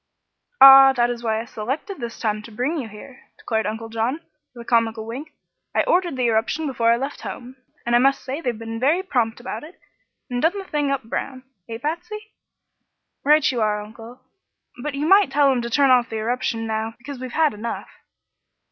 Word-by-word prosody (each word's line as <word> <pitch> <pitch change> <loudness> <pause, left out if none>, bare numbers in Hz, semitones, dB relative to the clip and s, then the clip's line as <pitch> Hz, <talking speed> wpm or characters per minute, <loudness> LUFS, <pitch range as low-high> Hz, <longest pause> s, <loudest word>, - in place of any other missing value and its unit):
"Ah, 270 0 +10
that 240 -1 +1
is 240 -1 -6
why 220 -1 0
I 225 - -5
selected 265 - -5
this 235 -2 -6
time 215 -2 -1
to 225 - -12
bring 250 +9 -2
you 250 - -5
here," 220 +5 -13 0.2
declared 220 -2 -2
Uncle 225 +1 -5
John, 230 +6 -2 0.4
with 235 -1 -10
a - - -33
comical 225 -2 +1
wink. 265 +8 -7 0.4
"I - - +3
ordered 350 -4 +1
the 255 - 0
eruption 230 +7 0
before 235 -5 +1
I 235 - +3
left 275 +3 -5
home, 250 +1 -8 0.3
and 240 0 +2
I - - +6
must 270 +2 +2
say 270 +5 -4
they've 245 -7 -2
been 225 0 -6
very 310 +9 +2
prompt 240 -11 -1
about 245 - -6
it, 325 +4 -13 0.5
and 245 -1 -3
done 335 +6 +2
the 395 - -5
thing 295 -6 -1
up 275 -2 -1
brown. 255 +3 -5 0.3
Eh, 225 - -5
Patsy?" 355 - -5 0.9
"Right 300 +1 +4
you 240 -3 -2
are, 210 -1 +1
Uncle. 225 +4 -11 0.6
But 295 +1 -4
you 285 +2 -2
might 390 -1 +5
tell 280 0 +4
'em 250 -2 0
to 235 - -4
turn 275 +2 +3
off 245 -2 +4
the 225 - -4
eruption 225 0 -2
now, 220 0 -3
because 265 +2 -9
we've 255 -1 -7
had 315 -2 +2
enough." 225 +3 -6
245 Hz, 205 wpm, -22 LUFS, 225-285 Hz, 0.9 s, Ah